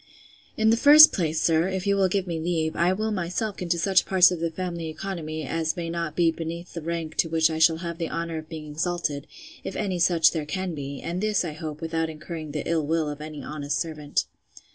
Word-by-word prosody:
In 220 0 +4
the 230 - +3
first 300 +5 +9
place, 160 -3 0
sir, 165 +2 +2
if 190 0 -3
you 200 0 +2
will 195 -1 +3
give 190 0 -1
me 170 -3 -3
leave, 160 -1 -1
I 175 +2 +2
will 215 +3 -1
myself 200 +3 -2
look - - -10
into 170 -1 0
such 190 +2 +3
parts 185 -2 +6
of 180 - -3
the 165 0 -1
family 170 -1 -4
economy, 155 -3 -5
as 160 +3 -2
may 165 -1 -3
not 170 -2 -3
be 170 -2 +3
beneath 170 +2 -6
the 170 - -5
rank 165 -1 -4
to 165 - +2
which 160 0 +3
I 160 - -3
shall 160 0 +5
have 170 0 -5
the 165 - -2
honour 165 0 -3
of 155 0 -12
being 160 -2 -7
exalted, 160 -2 -2 0.4
if - - -5
any 190 -4 -2
such 165 -2 +4
there 155 -3 -4
can 185 +1 -3
be; 140 -2 -6
and 175 +3 -4
this, 210 -3 +1
I 165 - -3
hope, 155 -1 -7
without 165 0 -1
incurring 155 0 -7
the 150 0 -4
ill 165 -2 +1
will 160 0 0
of 145 0 -7
any 155 -1 -7
honest 145 -1 -3
servant. 150 -3 -2
165 Hz, 235 wpm, -25 LUFS, 155-180 Hz, 0.4 s, first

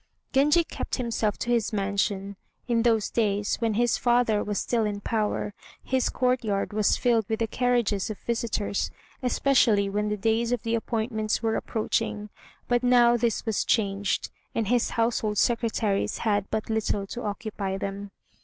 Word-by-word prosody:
Genji 295 +5 +4
kept - - -4
himself 230 -4 -1
to 240 - -2
his 235 -3 +1
mansion. 200 -1 -1 0.3
In 235 -2 +2
those 225 -3 +2
days, 205 -2 0
when 225 -2 0
his 240 +2 +2
father 240 -3 +2
was 205 -1 -3
still 230 +2 0
in 205 -1 -2
power, 210 -1 -1 0.3
his 260 -1 +1
courtyard 240 -6 0
was 210 -1 +2
filled 230 -4 +1
with 220 - 0
the 230 - +2
carriages 235 -4 0
of 215 - -5
visitors, 225 -3 -2 0.3
especially 235 -6 +3
when 210 +1 0
the 210 - -1
days 225 +3 +1
of 245 -2 -1
the 230 -1 -1
appointments 220 -1 -1
were 225 0 +1
approaching; 210 -1 -2 0.4
but 245 -1 +2
now 245 -1 +5
this 235 -1 0
was 220 -3 0
changed, 200 -3 0 0.2
and 220 -3 0
his 245 -1 +2
household 225 -2 0
secretaries 225 -4 +1
had 205 -3 0
but 215 - -2
little 210 -2 0
to 240 +5 -6
occupy 205 -2 -3
them. 200 +1 -5
220 Hz, 160 wpm, -26 LUFS, 205-235 Hz, 0.4 s, now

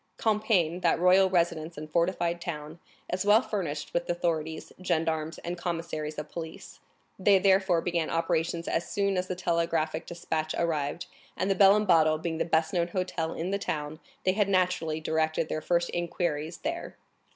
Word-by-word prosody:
Compiègne, 200 -6 +1
that 170 - +3
royal 185 +2 +5
residence 170 -3 0
and 155 +1 -6
fortified 170 +1 0
town, 155 -1 -6 0.3
is 185 +1 0
well 210 +4 +5
furnished 155 -8 -4
with 175 0 -1
authorities, 160 -2 -2
gendarmes, 160 -2 -1
and 175 +1 -4
commissaries 165 -3 -3
of 150 - -4
police; 165 -1 -8 0.4
they 195 +1 +5
therefore 190 -2 +3
began 170 -2 -1
operations 165 0 -1
as 170 - -1
soon 200 -1 0
as 180 0 -1
the 185 - -3
telegraphic 165 -3 -1
despatch 160 -2 -3
arrived, 160 -1 -1 0.3
and 190 +2 0
the - - +2
Bell 195 +1 +7
and 210 0 +1
Bottle 160 -4 +4
being 160 0 -3
the - - +1
best 160 -1 +1
known 170 -2 +1
hotel 175 -2 -2
in 175 +3 -3
the 200 - 0
town, 150 -3 -4 0.2
they 185 - +3
had 200 0 +1
naturally 180 -4 +1
directed 160 0 0
their 155 - -2
first 170 +1 +1
inquiries 170 -2 -2
there. 335 +3 -5
170 Hz, 170 wpm, -28 LUFS, 160-185 Hz, 0.4 s, Bell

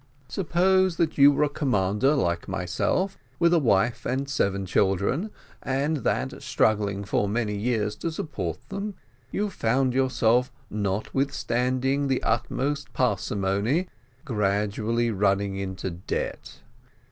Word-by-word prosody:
"Suppose 185 +2 +2
that 160 -3 0
you 140 +1 +9
were 145 - +2
a - - +3
commander 130 -2 +1
like 85 -10 0
myself, 95 - -1 0.2
with 170 0 +4
a 170 - +5
wife 115 -3 +2
and 135 +2 -1
seven 100 -7 0
children, 100 - +1 0.3
and 140 +4 0
that, 130 - -2
struggling 100 -2 +1
for 100 0 0
many 105 -1 -1
years 105 -1 0
to 165 - -3
support 155 -1 -5
them, 200 +1 -4 0.3
you 205 0 -1
found 125 -1 +1
yourself, 125 -2 +2 0.2
notwithstanding 125 +6 0
the 130 -2 0
utmost 140 +5 -1
parsimony, 105 - 0 0.4
gradually 105 +1 0
running 100 -1 +1
into 95 -1 -4
debt. 85 +3 -5
120 Hz, 120 wpm, -26 LUFS, 100-140 Hz, 0.4 s, you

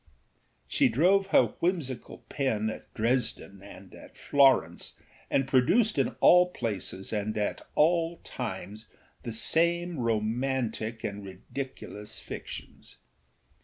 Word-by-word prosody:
She - - +3
drove 190 - +3
her - - +3
whimsical 165 -9 -3
pen 110 -6 -1
at - - -11
Dresden 115 -4 -1
and 100 -1 -13
at - - -14
Florence, 135 - +2 0.3
and 135 -1 +1
produced 185 - +3
in - - 0
all 180 0 +7
places 105 - -4
and 105 0 -2
at 105 - -2
all 165 +2 +2
times 105 -2 -6 0.3
the 120 - -5
same 170 +7 +2
romantic 115 0 -1
and 100 0 -4
ridiculous 105 +2 -8
fictions. - - -9
120 Hz, 110 wpm, -28 LUFS, 105-160 Hz, 0.3 s, all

